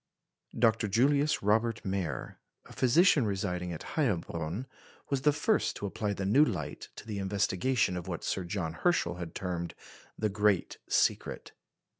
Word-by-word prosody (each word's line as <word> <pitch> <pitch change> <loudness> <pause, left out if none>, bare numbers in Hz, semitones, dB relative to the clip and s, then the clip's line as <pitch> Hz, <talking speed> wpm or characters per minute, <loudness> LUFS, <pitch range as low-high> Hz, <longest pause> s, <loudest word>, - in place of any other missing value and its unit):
Dr. 115 -2 +3
Julius 140 +8 +2
Robert 110 +2 +1
Mayer, 95 -8 -3 0.3
a - - -13
physician 145 +3 +4
residing 90 -4 -2
at 80 - -6
Heilbronn, 90 - -2 0.5
was 135 -2 +1
the 150 - +4
first 210 +9 +1
to - - -5
apply 100 +1 -2
the 95 -1 -4
new 125 +10 +5
light 80 - -3
to - - -10
the 105 -2 -4
investigation 100 +3 +1
of 90 -2 -5
what - - -4
Sir 95 - -1
John 85 -2 -3
Herschel 90 - +1
had 85 -2 -7
termed 85 -2 -3 0.4
the 110 - +1
"great 105 -1 +1
secret." - - 0
100 Hz, 150 wpm, -30 LUFS, 90-120 Hz, 0.5 s, new